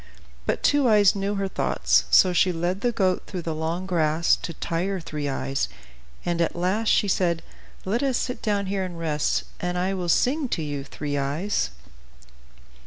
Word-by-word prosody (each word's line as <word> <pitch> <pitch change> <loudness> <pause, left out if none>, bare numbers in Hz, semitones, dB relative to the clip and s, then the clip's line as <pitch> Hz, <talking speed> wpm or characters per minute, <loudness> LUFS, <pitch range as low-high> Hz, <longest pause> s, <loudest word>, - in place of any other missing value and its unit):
But - - -1
Two 290 -3 +4
Eyes 205 -3 +5
knew 200 +1 -1
her 195 -1 -1
thoughts; - - +1
so 185 -1 +6
she 180 +1 +3
led 175 +3 -2
the 245 - +2
goat 190 -5 +1
through 180 -3 -5
the 160 - -2
long 165 +4 -2
grass 165 -2 +2
to - - -6
tire 175 +4 -2
Three 150 -3 -4
Eyes, 135 0 -1 0.6
and 170 -1 0
at 165 - 0
last 190 +6 0
she 205 - +3
said, 175 -3 +1 0.4
"Let 215 +6 0
us 270 -3 +1
sit 250 - -3
down 205 -2 0
here 195 0 -1
and 180 -2 -6
rest, 155 -3 0 0.2
and 180 0 -2
I 185 +2 0
will 180 -2 -3
sing 270 - +2
to 165 - -1
you, 145 -2 -4
Three 145 +1 -4
Eyes." 145 - -1
180 Hz, 180 wpm, -25 LUFS, 165-200 Hz, 0.6 s, so